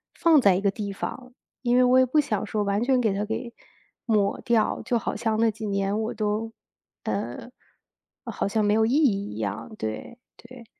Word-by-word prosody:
放 320 Hz, -4 st, +5 dB
在 195 Hz, -5 st, +5 dB
一 185 Hz, -, -1 dB
个 200 Hz, -1 st, +2 dB
地 200 Hz, 0 st, -5 dB
方， 250 Hz, +5 st, -6 dB, 0.3 s
因 245 Hz, -1 st, +2 dB
为 255 Hz, -, +6 dB
我 250 Hz, +1 st, +5 dB
也 260 Hz, -, +5 dB
不 300 Hz, +5 st, +2 dB
想 220 Hz, -9 st, 0 dB
说 210 Hz, +1 st, -1 dB
完 200 Hz, +2 st, 0 dB
全 255 Hz, 0 st, +3 dB
给 220 Hz, -5 st, +1 dB
它 200 Hz, +1 st, -1 dB
给 230 Hz, +3 st, -4 dB, 0.5 s
抹 210 Hz, -4 st, +1 dB
掉。 230 Hz, -2 st, +1 dB
就 245 Hz, -3 st, 0 dB
好 225 Hz, -, -3 dB
像 220 Hz, 0 st, -1 dB
那 225 Hz, 0 st, +3 dB
几 215 Hz, 0 st, -6 dB
年 200 Hz, +1 st, 0 dB
我 220 Hz, -, -3 dB
都 215 Hz, +1 st, -2 dB, 0.5 s
呃， -, -, -4 dB, 0.7 s
好， -, -, -2 dB
像 215 Hz, +1 st, +1 dB
没 205 Hz, -, +3 dB
有 220 Hz, +1 st, +3 dB
意 235 Hz, -, 0 dB
义 210 Hz, -, +1 dB
一 -, -, -8 dB
样。 110 Hz, -, -4 dB
对 110 Hz, -, -5 dB, 0.2 s
对。 240 Hz, 0 st, -13 dB
220 Hz, 215 characters per minute, -25 LUFS, 200-245 Hz, 0.7 s, 为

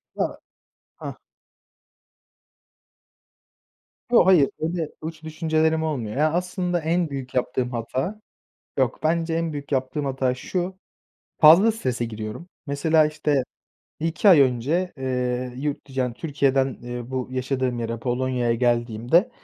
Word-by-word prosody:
Ya -, -, +1 dB, 0.7 s
hah. -, -, -6 dB, 3.0 s
Yo, 235 Hz, -, +6 dB
hayır, 180 Hz, -7 st, +6 dB
öyle 165 Hz, -1 st, -2 dB
uç 160 Hz, 0 st, -7 dB
düşüncelerim 160 Hz, 0 st, +1 dB
olmuyor. 125 Hz, -8 st, -3 dB
Ya, 155 Hz, +2 st, +3 dB
aslında 180 Hz, 0 st, -1 dB
en 165 Hz, +1 st, 0 dB
büyük 135 Hz, -2 st, -6 dB
yaptığım 125 Hz, 0 st, 0 dB
hata 130 Hz, -, -3 dB, 0.6 s
yok, -, -, +1 dB
bence 165 Hz, +1 st, +1 dB
en 165 Hz, -1 st, -1 dB
büyük 145 Hz, 0 st, -6 dB
yaptığım 130 Hz, +3 st, -1 dB
hata 130 Hz, -2 st, 0 dB
şu, 180 Hz, +7 st, -3 dB, 0.6 s
fazla 175 Hz, +9 st, +8 dB
strese 125 Hz, -, -2 dB
giriyorum. 110 Hz, +10 st, -7 dB, 0.2 s
Mesela, 155 Hz, +3 st, +3 dB
işte, 150 Hz, -3 st, 0 dB, 0.6 s
1-2 165 Hz, +5 st, +2 dB
ay 165 Hz, -6 st, +8 dB
önce, 140 Hz, +8 st, +1 dB
eee, 125 Hz, -1 st, -2 dB
yurt 145 Hz, +1 st, -3 dB
dı -, -, -14 dB
yani, 130 Hz, -2 st, -1 dB
Türkiye'den, 135 Hz, -2 st, 0 dB
eee, 120 Hz, +1 st, -6 dB
bu 130 Hz, -1 st, -2 dB
yaşadığım 130 Hz, -1 st, -1 dB
yere 115 Hz, 0 st, -3 dB
Polonya'ya 125 Hz, -1 st, 0 dB
geldiğimde, 120 Hz, -, +2 dB
140 Hz, 125 wpm, -24 LUFS, 125-160 Hz, 3.0 s, fazla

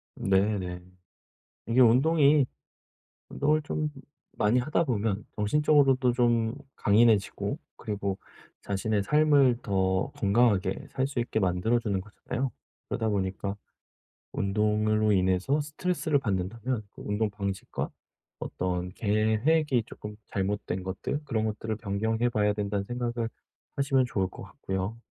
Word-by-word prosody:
네네. 95 Hz, -2 st, 0 dB, 0.9 s
이게 115 Hz, +3 st, +2 dB
운동이 140 Hz, +4 st, +5 dB, 0.8 s
운동을 150 Hz, +2 st, +1 dB
좀 150 Hz, +1 st, -2 dB, 0.5 s
많이 105 Hz, +4 st, +3 dB
하다 150 Hz, +6 st, +1 dB
보면 110 Hz, -6 st, -1 dB
정신적으로도 135 Hz, +2 st, +3 dB
좀 120 Hz, -2 st, +2 dB, 0.2 s
강인해지고 105 Hz, -1 st, +2 dB, 0.2 s
그리고 100 Hz, -2 st, -3 dB, 0.5 s
자신의 100 Hz, +1 st, 0 dB
삶을 145 Hz, -1 st, +4 dB
더 95 Hz, -2 st, 0 dB
건강하게 100 Hz, -2 st, +2 dB
살 130 Hz, +1 st, 0 dB
수 135 Hz, -3 st, -3 dB
있게 115 Hz, -2 st, -1 dB
만들어 95 Hz, +5 st, +1 dB
주는 100 Hz, -5 st, -1 dB
거잖아요. 120 Hz, +6 st, -4 dB, 0.4 s
그러다 110 Hz, -1 st, -1 dB
보니까 100 Hz, 0 st, -2 dB, 0.8 s
운동으로 105 Hz, +2 st, +1 dB
인해서 95 Hz, +8 st, +2 dB
스트레스를 155 Hz, 0 st, -1 dB
받는다면 110 Hz, +2 st, -2 dB
그 -, -, -13 dB
운동 105 Hz, +1 st, 0 dB
방식과 100 Hz, -2 st, -4 dB, 0.5 s
어떤 90 Hz, 0 st, -3 dB
계획이 115 Hz, +7 st, +2 dB
쪼끔 105 Hz, -2 st, -9 dB
잘못된 95 Hz, -1 st, -2 dB
것들 95 Hz, +10 st, -3 dB
그런 110 Hz, -5 st, -1 dB
것들을 110 Hz, 0 st, -3 dB
변경해 110 Hz, +3 st, -1 dB
봐야 105 Hz, -3 st, +1 dB
된다는 100 Hz, -1 st, -2 dB
생각을 120 Hz, 0 st, -2 dB, 0.5 s
하시면 135 Hz, -2 st, +2 dB
좋을 95 Hz, -6 st, -1 dB
것 -, -, -10 dB
같고요. 95 Hz, +4 st, -4 dB
110 Hz, 285 characters per minute, -28 LUFS, 100-125 Hz, 0.9 s, 운동이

